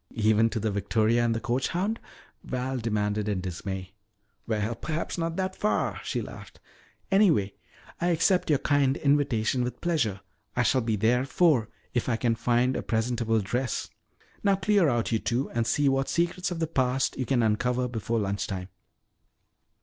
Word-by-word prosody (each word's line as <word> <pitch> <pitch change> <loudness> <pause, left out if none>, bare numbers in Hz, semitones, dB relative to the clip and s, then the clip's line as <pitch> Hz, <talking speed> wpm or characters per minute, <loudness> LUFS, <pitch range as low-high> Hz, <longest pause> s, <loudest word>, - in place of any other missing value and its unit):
"Even 110 0 +3
to 115 - -3
the 110 0 -1
victoria 110 +3 +1
and 115 -1 +1
the - - -1
coach 125 +2 -1
hound?" 200 +6 -1 0.4
Val 130 +1 -3
demanded 105 -2 -1
in 100 -3 0
dismay. 95 +1 -5 0.5
"Well, 110 0 -1
perhaps 155 +7 -4
not 165 -1 -2
that 190 0 -2
far," 210 - 0
she - - -2
laughed. - - -11 0.5
"Anyway, 165 - +4 0.5
I 175 - 0
accept 180 +1 +2
your 150 - +4
kind 140 -1 +2
invitation 130 -4 +1
with 125 - -4
pleasure. 120 - 0 0.3
I 120 - +2
shall 130 +2 +3
be 115 -1 0
there 115 +4 +2
at 135 - -4
four 140 -9 +3 0.2
if 120 0 0
I 120 - +2
can 115 0 +1
find 120 +2 +1
a - - -1
presentable 115 -1 0
dress. 120 +5 -2 0.5
Now 200 -1 +4
clear 195 -3 +3
out, 120 -2 0
you 115 - +2
two, 125 +5 -1
and 115 -1 0
see 145 +5 +2
what 135 0 +1
secrets 175 +2 0
of 175 - -4
the 165 - 0
past 130 -4 0
you 130 - -2
can 125 -3 +2
uncover 125 +3 +1
before 115 -1 -2
lunch 100 -1 -1
time." 95 -1 -5
120 Hz, 175 wpm, -27 LUFS, 110-145 Hz, 0.5 s, Anyway